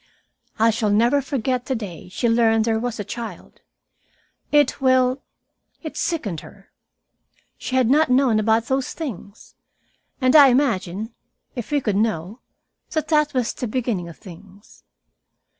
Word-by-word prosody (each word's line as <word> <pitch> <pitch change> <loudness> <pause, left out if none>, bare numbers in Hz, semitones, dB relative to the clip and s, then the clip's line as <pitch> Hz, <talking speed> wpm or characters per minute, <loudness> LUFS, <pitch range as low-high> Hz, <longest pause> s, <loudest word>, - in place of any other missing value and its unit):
I 225 +1 +4
shall 220 -1 -1
never 235 +7 +3
forget 255 -2 -2
the 265 - 0
day 190 -6 -7
she 235 +6 -1
learned 225 -1 +3
there 225 -1 +1
was 240 -1 -4
a - - -2
child. 230 +3 -8 0.9
It 295 -1 +3
well, 260 0 +3 0.6
it 315 - -6
sickened 225 - -2
her. 195 -1 -16 0.9
She 260 - -4
had 255 -3 +3
not 300 +4 +3
known 250 -4 +3
about 220 +1 +2
those 265 +1 -1
things. 220 - -8 0.7
And 255 +1 +3
I 290 -2 +10
imagine, 225 -5 0 0.4
if 240 -4 -5
we 290 -1 +1
could 210 -5 -1
know, 210 0 -1 0.5
that 315 - -2
that 300 -2 +2
was 250 -3 0
the 245 - -4
beginning 215 -7 -2
of 165 - -12
things. 195 +1 -15
235 Hz, 145 wpm, -22 LUFS, 210-265 Hz, 0.9 s, I